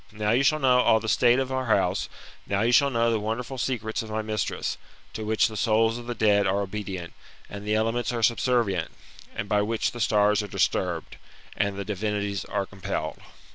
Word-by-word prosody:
Now 105 Hz, 0 st, -1 dB
you 120 Hz, +3 st, +3 dB
shall 155 Hz, +3 st, +3 dB
know 130 Hz, -4 st, +4 dB
all 110 Hz, -, +4 dB
the 110 Hz, -, -6 dB
state 120 Hz, +2 st, +4 dB
of 130 Hz, 0 st, -1 dB
our 130 Hz, -1 st, -2 dB
bouse; 110 Hz, -, +1 dB, 0.4 s
now 100 Hz, 0 st, 0 dB
you 120 Hz, -, +2 dB
shall 140 Hz, +3 st, +5 dB
know 115 Hz, -2 st, +1 dB
the 110 Hz, -, +1 dB
wonderful 115 Hz, +5 st, -4 dB
secrets 115 Hz, -2 st, -2 dB
of 110 Hz, -, -8 dB
my 110 Hz, 0 st, -2 dB
mistress, 110 Hz, 0 st, -2 dB, 0.3 s
to 110 Hz, -, -5 dB
which 110 Hz, +1 st, +2 dB
the 110 Hz, -, -8 dB
souls 110 Hz, +2 st, +2 dB
of 120 Hz, -, -10 dB
the 120 Hz, -, -3 dB
dead 105 Hz, -2 st, +3 dB
are 100 Hz, +2 st, +1 dB
obedient, 95 Hz, -3 st, -5 dB, 0.3 s
and 100 Hz, 0 st, -8 dB
the 105 Hz, -, +2 dB
elements 115 Hz, +2 st, 0 dB
are 120 Hz, -2 st, -3 dB
subsenrient, 115 Hz, -6 st, +2 dB, 0.5 s
and 100 Hz, -, -4 dB
by 105 Hz, -1 st, +2 dB
which 110 Hz, +2 st, 0 dB
the 120 Hz, -, -7 dB
stars 105 Hz, 0 st, +3 dB
are 105 Hz, -, -6 dB
disturbed, 90 Hz, -3 st, -1 dB, 0.4 s
and 100 Hz, -1 st, -1 dB
the 100 Hz, -, -4 dB
divinities 100 Hz, -1 st, -2 dB
are 100 Hz, -1 st, -2 dB
compelled. 95 Hz, -1 st, -5 dB
110 Hz, 205 wpm, -26 LUFS, 100-120 Hz, 0.5 s, shall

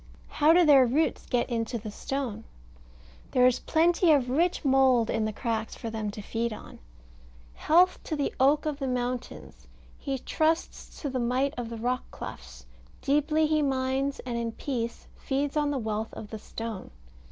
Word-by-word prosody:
How 300 Hz, +1 st, +4 dB
do 350 Hz, +1 st, +6 dB
their 275 Hz, -4 st, +7 dB
roots 300 Hz, +7 st, 0 dB
get 245 Hz, -2 st, 0 dB
into 235 Hz, 0 st, -2 dB
the 215 Hz, -1 st, -7 dB
stone? 240 Hz, -2 st, -4 dB, 0.9 s
There 250 Hz, -1 st, +5 dB
is 255 Hz, -1 st, +3 dB
plenty 335 Hz, +1 st, +3 dB
of 260 Hz, -4 st, +3 dB
rich 335 Hz, +3 st, +1 dB
mould 260 Hz, -4 st, +4 dB
in 225 Hz, -1 st, 0 dB
the 215 Hz, -, -1 dB
cracks 220 Hz, 0 st, -3 dB
for 225 Hz, -, -6 dB
them 220 Hz, -1 st, -3 dB
to 205 Hz, 0 st, -7 dB
feed 230 Hz, +2 st, -2 dB
on 215 Hz, -, -10 dB, 0.7 s
"Health 360 Hz, +4 st, +3 dB
to 315 Hz, -, -2 dB
the 285 Hz, -2 st, -1 dB
oak 285 Hz, +4 st, +4 dB
of 300 Hz, -2 st, -2 dB
the 270 Hz, -, -2 dB
mountains; 250 Hz, 0 st, -4 dB, 0.3 s
he 275 Hz, -2 st, -3 dB
trusts 315 Hz, +5 st, -1 dB
to 285 Hz, -, -1 dB
the 255 Hz, -, -2 dB
might 255 Hz, +3 st, 0 dB
of 240 Hz, -2 st, -5 dB
the 230 Hz, -, -6 dB
rock 245 Hz, +2 st, -1 dB
clefts. -, -, -9 dB, 0.4 s
Deeply 300 Hz, +2 st, +2 dB
he 305 Hz, 0 st, +2 dB
mines, 270 Hz, 0 st, 0 dB
and 240 Hz, -2 st, -4 dB
in 230 Hz, -1 st, -3 dB
peace 235 Hz, -4 st, -4 dB
feeds 280 Hz, +2 st, -2 dB
on 295 Hz, -1 st, +1 dB
the 285 Hz, -, -1 dB
wealth 220 Hz, -2 st, -3 dB
of 210 Hz, -, -8 dB
the 220 Hz, -, -6 dB
stone." 225 Hz, -2 st, -7 dB
255 Hz, 175 wpm, -27 LUFS, 230-290 Hz, 0.9 s, their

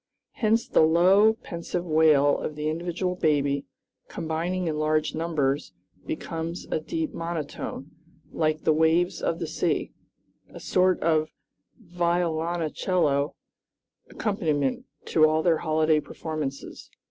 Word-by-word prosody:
Hence 225 Hz, +1 st, +1 dB
the -, -, +3 dB
low, 185 Hz, +7 st, +5 dB
pensive 170 Hz, +1 st, -4 dB
wail 155 Hz, -3 st, +4 dB
of 155 Hz, -, -4 dB
the 150 Hz, +1 st, -2 dB
individual 175 Hz, +3 st, -2 dB
baby, 145 Hz, -4 st, +1 dB, 0.4 s
combining 170 Hz, +3 st, -3 dB
in 155 Hz, -1 st, -2 dB
large 155 Hz, 0 st, +1 dB
numbers, 145 Hz, -, -1 dB, 0.3 s
becomes 165 Hz, +2 st, -4 dB
a -, -, +1 dB
deep 325 Hz, -, -3 dB
monotone, 165 Hz, -3 st, -5 dB, 0.4 s
like 155 Hz, -1 st, 0 dB
the 155 Hz, -, +4 dB
waves 160 Hz, +3 st, +2 dB
of -, -, 0 dB
the -, -, -3 dB
sea, -, -, -1 dB, 0.6 s
a -, -, -11 dB
sort 185 Hz, 0 st, +2 dB
of 155 Hz, -1 st, +2 dB, 0.5 s
violoncello 170 Hz, -, 0 dB, 0.7 s
accompaniment 155 Hz, -, -1 dB, 0.2 s
to 155 Hz, -1 st, +4 dB
all 155 Hz, 0 st, +1 dB
their 165 Hz, -3 st, +3 dB
holiday 155 Hz, -1 st, +2 dB
performances. 150 Hz, -2 st, -6 dB
160 Hz, 115 wpm, -26 LUFS, 155-175 Hz, 0.7 s, low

